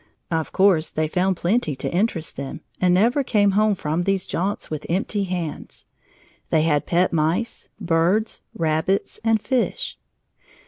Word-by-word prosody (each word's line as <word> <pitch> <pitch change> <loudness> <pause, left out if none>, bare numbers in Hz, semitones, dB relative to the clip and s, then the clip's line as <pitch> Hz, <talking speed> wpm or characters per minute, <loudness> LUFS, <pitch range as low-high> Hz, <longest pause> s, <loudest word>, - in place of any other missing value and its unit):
Of 160 -1 -1
course 185 -5 +3
they 155 0 -1
found 185 +3 0
plenty 175 - 0
to - - -4
interest 175 -4 -1
them 135 0 -6 0.2
and 180 -1 +4
never 235 +10 +3
came 205 -5 +3
home 210 +1 +3
from 165 -1 -1
these 195 0 0
jaunts 195 +1 -3
with 155 -1 -4
empty 195 +3 0
hands. 175 -4 -5 0.6
They 155 - +3
had 150 -3 +1
pet 175 +1 +2
mice, 165 +9 0
birds, 180 +4 +1
rabbits, 160 +4 0
and 225 -1 +3
fish. 260 - -1
180 Hz, 145 wpm, -23 LUFS, 160-205 Hz, 0.6 s, and